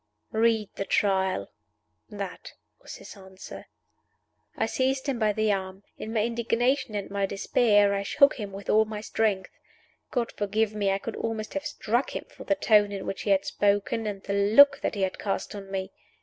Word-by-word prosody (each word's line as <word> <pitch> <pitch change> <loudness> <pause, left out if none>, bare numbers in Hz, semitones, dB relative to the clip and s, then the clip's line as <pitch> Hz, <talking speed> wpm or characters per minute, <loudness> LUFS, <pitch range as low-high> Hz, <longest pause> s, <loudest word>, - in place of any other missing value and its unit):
"Read 220 -1 +2
the - - -1
Trial." 190 -2 0 0.6
That - - -7 0.3
was - - -9
his - - -11
answer. 190 -1 -11 0.9
I - - +1
seized 265 0 0
him 265 -4 -1
by 215 -2 +3
the 215 0 +1
arm. 190 0 -4 0.2
In 220 - -6
my 220 -2 +1
indignation 235 +1 0
and 200 -1 -3
my 200 -1 0
despair 205 +1 +3
I 200 - -1
shook 280 +7 +3
him 205 -2 -5
with 195 +1 -9
all 220 +1 +4
my 215 -1 -6
strength. 210 -3 -1 0.6
God 240 -3 -1
forgive 210 +1 -1
me, 205 -2 0
I 195 - +2
could 220 +2 -6
almost 220 -1 -4
have 290 0 -3
struck 240 -3 -1
him - - -4
for - - -12
the 295 - +2
tone 210 -7 +4
in 195 -1 -5
which 195 - -4
he - - -3
had 195 0 +3
spoken 205 +2 0
and 200 -2 -5
the 200 - -3
look 215 +8 +6
that - - -2
he 200 - -1
had 190 - -2
cast 195 -2 -3
on 200 -1 -8
me! 190 0 -4
210 Hz, 190 wpm, -27 LUFS, 195-225 Hz, 0.9 s, look